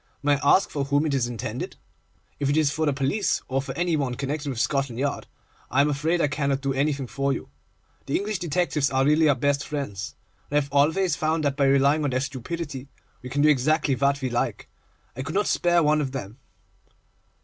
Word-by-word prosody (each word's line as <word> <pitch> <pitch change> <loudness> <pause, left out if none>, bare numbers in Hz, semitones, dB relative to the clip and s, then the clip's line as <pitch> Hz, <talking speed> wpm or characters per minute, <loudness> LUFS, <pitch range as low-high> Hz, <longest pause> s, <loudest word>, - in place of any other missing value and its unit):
May 145 -1 +3
I 140 - +5
ask 195 - 0
for 140 -2 -2
whom 145 +2 +1
it 150 - 0
is 130 -3 +1
intended? 120 -3 -5 0.6
If 140 -1 0
it 145 - +2
is 155 -3 +3
for 155 +2 -1
the - - +3
police, 140 +10 0
or 135 +1 0
for 135 -1 -7
any 175 -1 +1
one 135 -5 -1
connected 140 +2 -3
with 125 -4 -4
Scotland 135 -2 0
Yard, 140 +2 -2 0.4
I 130 - +1
am 145 +1 +4
afraid 160 +5 0
I - - +3
cannot 140 -1 -1
do 135 -1 -1
anything 140 0 0
for 140 +2 -1
you. - - -4 0.6
The 140 - -1
English 205 -1 -2
detectives 165 -3 0
are 135 0 +1
really 155 +1 +4
our 145 - +4
best 140 +2 0
friends, 135 -10 -4 0.3
and 145 - +1
I - - +5
have 140 0 -9
always 160 +4 +3
found 155 0 0
that 140 -2 +1
by 140 -1 +2
relying 140 +3 +3
on 145 - +1
their 130 0 0
stupidity, 140 +1 -5 0.3
we 125 - -8
can 145 +3 +1
do 155 - +6
exactly 150 +1 +2
what 140 +1 +1
we 130 - -1
like. 120 - -2 0.5
I 130 - -4
could 140 - -5
not 205 +1 +2
spare 175 -2 +2
one 150 0 +3
of 135 -2 -3
them. 120 -2 -6
140 Hz, 220 wpm, -25 LUFS, 135-155 Hz, 0.6 s, do